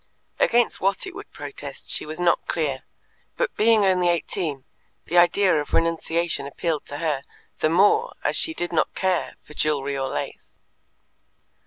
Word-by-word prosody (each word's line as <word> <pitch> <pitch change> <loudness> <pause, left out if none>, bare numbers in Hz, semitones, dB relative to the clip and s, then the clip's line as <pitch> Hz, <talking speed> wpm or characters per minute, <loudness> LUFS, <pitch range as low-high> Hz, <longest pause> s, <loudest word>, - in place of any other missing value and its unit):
Against 240 0 +3
what 195 - +1
it 370 - -7
would 410 +3 -10
protest - - -8
she - - -3
was 155 +2 -6
not 175 -1 +2
clear; 145 -5 -1 0.6
but - - -1
being 220 -1 +4
only 180 -2 +3
eighteen, 165 -4 -1 0.4
the 175 - -4
idea 175 -2 +4
of 145 - -9
renunciation 165 -2 0
appealed 155 +2 -2
to 145 - -5
her, 150 -4 -1 0.4
the 155 - +2
more 205 - +3
as - - +1
she 320 - +1
did 175 0 -3
not 155 - +1
care 185 -2 0
for - - -14
jewellery 140 -2 0
or 135 -1 -2
lace. 75 - -6
170 Hz, 160 wpm, -24 LUFS, 150-195 Hz, 0.6 s, being